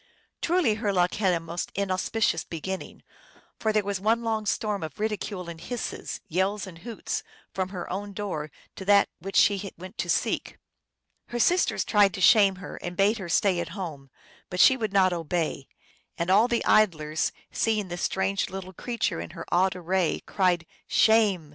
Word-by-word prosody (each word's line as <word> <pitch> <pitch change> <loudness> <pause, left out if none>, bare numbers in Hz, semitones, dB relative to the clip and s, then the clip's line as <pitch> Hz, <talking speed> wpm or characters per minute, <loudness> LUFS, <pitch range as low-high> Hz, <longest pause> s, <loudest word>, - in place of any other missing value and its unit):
Truly 345 -9 +2
her 205 - +1
luck 180 -2 +2
had 195 -3 +2
a 170 - +1
most 165 +1 -5
inauspicious 195 -1 0
beginning, 185 +3 -6 0.6
for 220 - +1
there 215 -1 +2
was 200 -1 -2
one 225 +3 +2
long 220 -2 -1
storm 210 -1 -1
of 155 +1 -7
ridicule 210 -4 -3
and 165 -1 -8
hisses, 245 +6 -5
yells 190 +4 0
and 175 -3 -11
hoots, 230 +3 -4 0.3
from 185 -1 -2
her 180 -3 -6
own 200 +2 -4
door 185 -7 -4 0.3
to 190 - -7
that 200 0 +5
which 195 +3 -7
she 200 -1 +3
went 185 +3 -11
to - - -2
seek. - - 0 0.7
Her 240 - -4
sisters 355 +10 +2
tried 205 -3 +4
to - - -5
shame 195 +1 +6
her, 185 0 -8
and 175 0 -6
bade 205 +3 +3
her 180 -3 -6
stay 185 +1 +2
at 170 -1 -3
home, 150 -8 -6 0.4
but 180 - -4
she 260 - +8
would 220 -5 -2
not 190 -2 +4
obey; 165 -4 -2 0.5
and 170 +2 0
all 210 +5 +6
the 240 -2 0
idlers, 155 -7 +2 0.2
seeing 215 -4 0
this 175 0 -5
strange 190 +1 0
little 190 0 -7
creature 230 - -2
in 85 - -7
her - - -6
odd 185 +1 +3
array, 180 0 0
cried, 180 -4 +1 0.2
" - - -40
Shame 210 -8 +3
190 Hz, 180 wpm, -26 LUFS, 175-210 Hz, 0.7 s, she